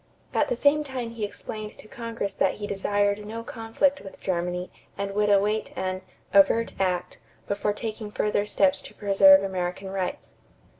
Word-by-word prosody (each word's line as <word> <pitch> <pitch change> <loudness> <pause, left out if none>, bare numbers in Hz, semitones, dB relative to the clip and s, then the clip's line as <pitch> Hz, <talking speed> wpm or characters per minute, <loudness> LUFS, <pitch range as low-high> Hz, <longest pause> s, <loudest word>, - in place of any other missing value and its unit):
At - - +2
the - - 0
same 300 -5 +3
time 255 -5 -5
he 230 -2 -6
explained 210 +1 -6
to - - -13
Congress 230 -4 -4
that - - +1
he 210 - -5
desired 205 +1 0
no 225 +2 -6
conflict 235 +5 0
with 195 - -11
Germany 180 0 -2 0.3
and 200 0 -2
would 210 +1 +1
await 205 +2 +2
an 185 0 -2 0.3
"overt 210 +4 +5
act" 180 -2 -1 0.3
before 205 +1 0
taking 215 0 -5
further 210 0 0
steps 190 -2 +3
to - - -12
preserve 195 -1 +6
American 190 0 -3
rights. 190 -2 -4
205 Hz, 160 wpm, -26 LUFS, 195-225 Hz, 0.3 s, preserve